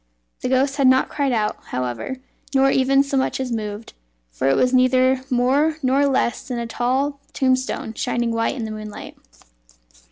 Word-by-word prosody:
The 250 - -3
ghost 270 +2 +1
had 275 -2 +4
not 260 0 +4
cried 280 -2 -1
out, 215 -3 0
however, 125 - -4 0.4
nor 270 0 +4
even 275 +1 +3
so 275 -1 -2
much 265 - 0
as 260 -2 -3
moved, 215 -1 -5 0.4
for 95 - 0
it 135 - +3
was 255 0 +2
neither 255 0 +3
more 275 +5 +2
nor 270 +2 +3
less 260 -2 0
than 250 -3 -3
a 235 - -3
tall 265 +5 -1
tombstone 260 -4 0
shining 240 +1 -1
white 230 +4 0
in 235 -4 -4
the 220 - -5
moonlight. 215 -1 -8
255 Hz, 170 wpm, -21 LUFS, 230-270 Hz, 0.4 s, had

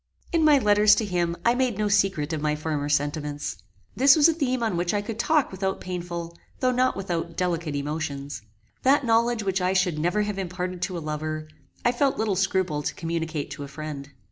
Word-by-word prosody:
In 335 -3 +2
my 300 -2 +6
letters 210 -3 +5
to 220 - 0
him 175 -3 -1
I 235 - +5
made 250 -4 0
no 210 0 +1
secret 195 -6 +1
of 155 - -2
my 150 0 +1
former 150 -1 -2
sentiments. 145 - -1 0.4
This 270 +2 +7
was 310 -1 +6
a 330 - +3
theme 255 -6 -1
on 220 -5 0
which 175 +3 0
I 205 - +1
could 225 +1 -6
talk 305 +2 +2
without 190 0 -2
painful, 170 -2 -5 0.2
though 255 - +2
not 255 +1 +2
without 175 -3 -3
delicate 170 -4 -1
emotions. 145 -3 -4 0.4
That 275 +1 +3
knowledge 230 0 +2
which 190 -1 0
I 180 +1 +1
should 180 -4 +1
never 175 +6 +1
have 205 -1 -3
imparted 180 -1 -4
to 180 0 -2
a 165 - -6
lover, 155 0 -3 0.4
I 240 - +5
felt 270 +2 +1
little 215 -3 0
scruple 185 -5 0
to - - -3
communicate 165 -3 -3
to 145 0 -6
a - - -6
friend. 140 -1 -7
180 Hz, 205 wpm, -25 LUFS, 155-220 Hz, 0.4 s, This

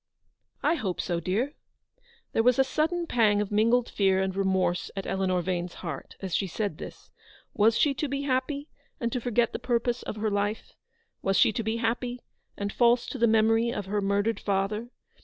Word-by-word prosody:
" - - -44
I 305 - +4
hope 200 - -2
so, 175 -2 -1
dear." 215 - -1 0.8
There - - +2
was 250 +1 +4
a 270 - +6
sudden 320 +6 0
pang 215 -8 +3
of 210 -1 -2
mingled 230 +3 +3
fear 190 -2 +2
and 190 0 -1
remorse 190 -2 +1
at 195 - -4
Eleanor 185 -2 0
Vane's 175 -1 -2
heart 155 -5 -6
as 190 -3 -4
she 195 - +1
said 200 -2 -3
this. - - -10 0.4
Was 220 +1 +4
she 290 - +3
to 285 +3 -2
be 280 +1 -2
happy, 280 +2 -1 0.3
and 235 -1 -1
to 250 - -2
forget 240 0 +1
the - - -3
purpose 240 0 0
of - - -5
her 215 0 -1
life? 205 +2 -2 0.5
Was 195 0 +1
she - - +5
to 230 - -1
be 220 +1 -1
happy, 240 +2 -1 0.4
and 200 0 -3
false 240 0 +4
to - - -5
the 235 - +4
memory 225 +1 +3
of 205 -4 -3
her 205 +2 -1
murdered 200 +3 +1
father 205 +4 -1
220 Hz, 195 wpm, -27 LUFS, 195-245 Hz, 0.8 s, a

